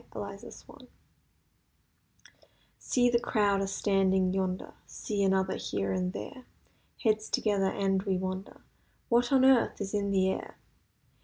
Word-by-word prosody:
EUROPE'S 200 0 -8
WAR 285 - -14 2.0
See 245 -1 +2
the 235 - +3
crowd 205 -4 +1
a 195 - -1
standing 190 -2 +1
yonder; 185 -1 -2
See 205 -2 -4
another 190 -1 +1
here 95 -1 -2
and 90 -1 -1
there, 105 - -8 0.6
Heads 215 -2 +1
together, 200 -3 +1
and 195 -1 0
we 195 -2 -1
wonder— 185 +1 -5 0.5
'What 240 +1 +2
on 265 -1 +5
earth 265 -3 +4
is 200 -1 -4
in 200 -1 0
the 190 -1 +2
air! - - -6
195 Hz, 135 wpm, -29 LUFS, 190-215 Hz, 2.0 s, on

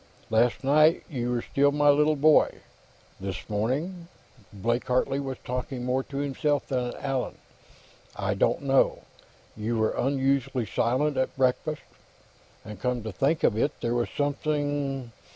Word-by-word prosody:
"Last 115 +4 +2
night, 155 +4 +4
you 120 -4 -2
were 120 -1 -1
still 145 +1 +2
my 145 0 +3
little 150 +2 +3
boy. 150 +2 +5 0.7
This 95 -1 -5
morning 145 - -2 0.3
" 110 -6 -26
Blake 115 +4 -1
Hartley 130 +2 +1
was 135 -2 -4
talking 125 0 -4
more 130 +1 +1
to 140 +1 -8
himself 145 +1 0
than 125 -2 -1
to - - -9
Allan. 135 -2 -2 0.8
"I - - -1
don't - - +1
know. 135 -1 +2 0.5
You 110 +2 -2
were 110 0 +2
unusually 135 -2 0
silent 130 +8 0
at 130 - -1
breakfast. 135 +4 0 0.8
And 105 -2 -9
come 125 -2 -1
to 110 - -4
think 140 - 0
of 105 - +3
it, 140 +6 0
there 120 0 0
was 120 -1 0
something 145 -3 -2
135 Hz, 150 wpm, -27 LUFS, 120-145 Hz, 0.8 s, boy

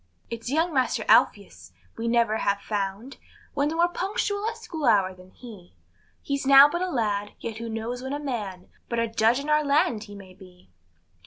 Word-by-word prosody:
It's 230 +1 -5
young 325 +4 0
master 260 -2 0
Alpheus - - +2 0.2
we 230 +1 -4
never 230 -2 +2
have 200 -2 0
found 205 +5 -4 0.4
One 285 0 0
more 335 +2 +2
punctual 405 +3 -2
at 460 - -8
school 340 -10 -6
hour 200 -5 +3
than 185 0 -17
he; 200 - -14 0.5
He's 280 -1 -2
now 275 +1 +9
but 345 +4 -3
a 370 - -1
lad, 205 - -2
yet 225 -2 -6
who 230 0 -6
knows 225 +3 -4
when 265 +1 -6
a 290 - -3
man, 210 -10 -5 0.2
But 235 - -2
a 230 0 +1
Judge 225 +2 +2
in 285 - -6
our 300 0 +3
land 280 -7 +1
he 205 -1 -11
may 190 -2 -12
be. 180 - -18
235 Hz, 190 wpm, -25 LUFS, 205-290 Hz, 0.5 s, now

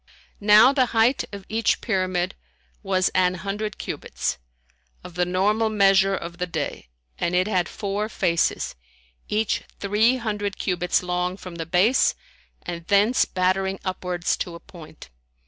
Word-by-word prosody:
Now 210 +5 +7
the 260 -3 +3
height 235 +4 +3
of 200 -2 -8
each 225 +1 +1
pyramid 185 -4 -1 0.5
was 185 -1 +1
an 185 0 +2
hundred 200 +3 -4
cubits, - - -4 0.6
of 180 - -10
the 180 +1 0
normal 210 +5 +1
measure 195 -2 +4
of 170 0 -7
the 180 - -1
day, 165 - -4 0.3
and 170 - 0
it 185 +2 +2
had 185 -4 0
four 205 +1 -3
faces, 170 -6 0 0.6
each 215 0 0 0.2
three 210 +5 +3
hundred 210 -4 -3
cubits 180 -1 0
long 180 +1 -2
from 180 -3 -9
the 165 -1 -5
base 195 +9 +3 0.5
and 170 -1 -6
thence 205 +5 +4
battering 190 +1 0
upwards 180 -2 -1
to 175 - -5
a - - -9
point. 155 - -14
190 Hz, 145 wpm, -24 LUFS, 180-210 Hz, 0.6 s, Now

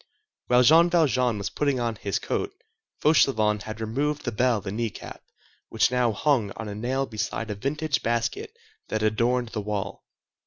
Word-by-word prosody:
While 125 0 +5
Jean 165 +6 +6
Valjean 130 -9 +2
was 100 -1 -4
putting 140 0 0
on 120 -1 -1
his 100 -2 -2
coat, - - -2 0.5
Fauchelevent 110 -9 +3
had 110 0 -6
removed 140 +7 -2
the 120 - -1
bell 120 +1 +2
and 95 +1 -4
kneecap, 115 -2 -5 0.5
which 110 +1 +2
now 125 -2 +2
hung 115 -1 +1
on 110 - -5
a 105 - -5
nail 125 +6 -1
beside 110 -1 -4
a - - -1
vintage 140 +6 -1
basket 255 - -1 0.4
that 110 - -2
adorned 115 +3 +1
the 110 -1 -4
wall. 100 -1 -4
120 Hz, 165 wpm, -25 LUFS, 110-135 Hz, 0.5 s, Jean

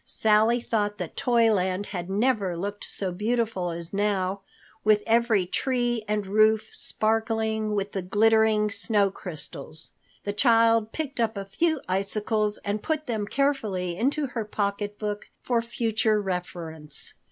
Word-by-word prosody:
Sally 220 +2 +3
thought 210 -3 -1
that 180 -4 -6
Toyland 210 -6 +2
had 175 -1 -4
never 200 -4 +1
looked 205 +3 -4
so 190 -2 -3
beautiful 215 -1 -1
as 170 +1 -6
now, 200 -1 0 0.4
with 210 -1 +4
every 225 -4 +3
tree 240 +2 -1
and 210 -1 -1
roof 215 +2 +3
sparkling 220 -1 -1
with 200 0 -2
the 195 - -3
glittering 215 +2 +3
snow 205 -2 +2
crystals. 160 -3 -7 0.3
The 205 - -2
child 230 -1 +4
picked 310 -6 -4
up 225 -2 0
a 195 - -4
few 315 +9 0
icicles 210 +2 0
and 205 +1 -1
put 310 -1 -2
them 220 -5 -2
carefully 215 -11 0
into 280 - 0
her 245 -4 -3
pocketbook 205 0 -3
for 240 -2 +1
future 225 -2 0
reference. 170 -6 -3
210 Hz, 135 wpm, -26 LUFS, 195-225 Hz, 0.4 s, with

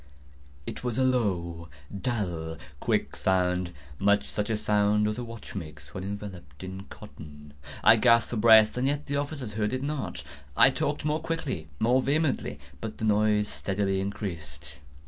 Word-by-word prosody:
It - - -6
was 120 -3 -2
a 130 - +3
low, 90 -10 0 0.3
dull, 90 -8 -2 0.2
quick - - 0
sound—much 90 -1 +1
such 105 0 -3
a 110 - +1
sound 105 0 +2
as 105 +2 -2
a - - -3
watch 115 +1 -9
makes 80 -7 -8
when 95 - -5
enveloped 95 -7 -7
in 95 +1 -7
cotton. 75 -5 -12 0.3
I - - +8
gasped 115 0 +4
for 120 - -1
breath—and 110 +3 +6
yet 145 +1 -1
the 140 0 -1
officers 140 -6 -4
heard 105 +1 -1
it 130 +1 -2
not. 140 - -3 0.3
I - - +8
talked - - -2
more 150 +1 +1
quickly—more 125 - 0
vehemently; 140 - 0 0.2
but 110 +6 -6
the 110 - -2
noise 105 0 +3
steadily 95 -1 -1
increased. 75 -8 -6
105 Hz, 150 wpm, -28 LUFS, 85-120 Hz, 0.3 s, I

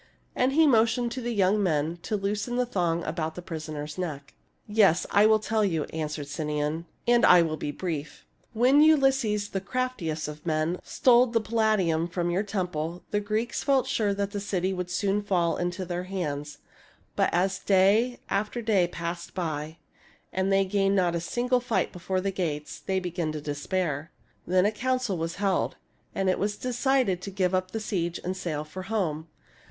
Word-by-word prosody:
And 255 +2 +2
he 320 +2 +5
motioned 235 -2 +3
to 255 - -4
the 240 0 -2
young 205 -1 +2
men 160 -2 0
to 215 - -2
loosen 205 +4 -2
the 250 0 +2
thong 170 -7 0
about 160 -2 -3
the 180 - -6
prisoner's 155 -2 -6
neck. 145 -6 -5 0.2
" - - -44
Yes, 205 -5 +4
I 205 +1 +6
will 220 0 +5
tell 215 0 0
you," 165 -6 +1
answered 155 -2 -3
Sinon, 150 +2 -2 0.2
"and 240 0 +4
I 180 -1 +7
will 160 -1 -1
be 150 - -4
brief. 155 -2 -5 0.3
When 255 +6 +5
Ulysses, 270 -9 +3
the 195 - -3
craftiest 195 -10 -2
of 150 0 -8
men, 160 +2 0
stole 250 0 +4
the 230 -1 +1
Palladium 215 -7 +1
from 175 0 -2
your 180 +3 +1
temple, 180 -5 -3
the 205 - +2
Greeks 215 +3 -2
felt 270 -2 +3
sure 220 -6 0
that 200 0 -2
the 205 - -3
city 190 -2 -1
would 180 -1 -4
soon 200 +3 0
fall 175 -5 +1
into 175 +1 -3
their 175 +1 -3
hands. 150 -6 -4 0.6
But - - +2
as 185 +2 +1
day 205 +6 +3
after 210 +4 -1
day 200 -6 +3
passed 170 0 -6
by, 155 -2 -3 0.6
and 190 +1 0
they 195 0 +4
gained 195 0 +1
not 180 -3 +2
a 170 - 0
single 245 +7 0
fight 240 -2 -1
before 185 +1 -2
the 195 +1 -1
gates, 155 -6 -3
they 190 -1 -1
began 175 -3 -3
to 155 - -4
despair. 150 +1 -2 0.4
Then 185 +1 +3
a 210 - +3
council 255 -2 -1
was 165 +1 -3
held, 195 -1 0 0.4
and 195 -1 0
it 185 - +2
was 205 +1 -1
decided 250 -6 +1
to 200 - -5
give 190 -2 0
up 185 0 0
the 225 - -4
siege 175 -6 -2
and 185 +1 -2
sail 165 -5 -3
for 155 +5 -8
home. 165 -8 -1
185 Hz, 185 wpm, -27 LUFS, 165-215 Hz, 0.6 s, I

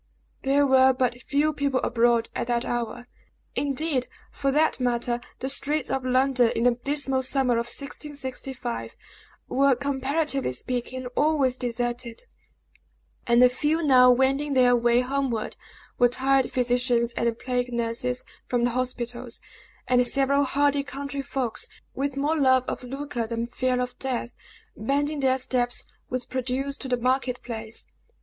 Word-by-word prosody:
There 280 +1 +3
were 265 -1 +5
but 250 -1 -1
few 295 +4 +1
people 280 -3 0
abroad 235 -1 +2
at - - -3
that 240 -1 0
hour; 240 0 -3 0.5
indeed, 285 -2 0 0.2
for 275 - -1
that 305 +1 +2
matter, 240 -1 0 0.2
the 260 - -4
streets 285 +1 0
of 265 -1 -1
London, 255 -1 +3
in 230 - 0
the 245 - +5
dismal 270 +2 -1
summer 260 -1 +2
of 235 0 0
1665, 265 -2 -5 0.5
were, 275 0 +3
comparatively 280 - -1
speaking, 250 - -3
always 290 -4 +2
deserted; 240 -1 -3 1.0
and 235 +1 +5
the - - +9
few 300 +6 0
now 255 -4 +7
wending 270 +3 +2
their 250 -2 +5
way 240 0 +3
homeward 255 -4 -2 0.4
were 245 - +6
tired 265 +1 +2
physicians 245 -1 +1
and 235 -1 0
plague 250 0 -2
nurses 235 +2 -1 0.2
from 245 -1 0
the 245 - +2
hospitals, 245 -1 -3 0.5
and 250 -1 +4
several 275 +2 +2
hardy 285 +1 +2
country 280 0 -5
folks, 260 -4 -3 0.3
with 275 0 -2
more 295 +3 +1
love 260 -4 +4
of - - -4
lucre 260 -2 -4
than 230 0 -2
fear 255 +1 -1
of 250 0 -4
death 250 -2 -2 0.4
bending 285 +6 0
their 260 -1 +3
steps 250 -1 -1 0.3
with 250 -1 -3
produce 260 +2 -2
to - - -4
the 250 -1 +1
market 255 +1 0
place. 225 -1 -6
255 Hz, 145 wpm, -25 LUFS, 245-275 Hz, 1.0 s, the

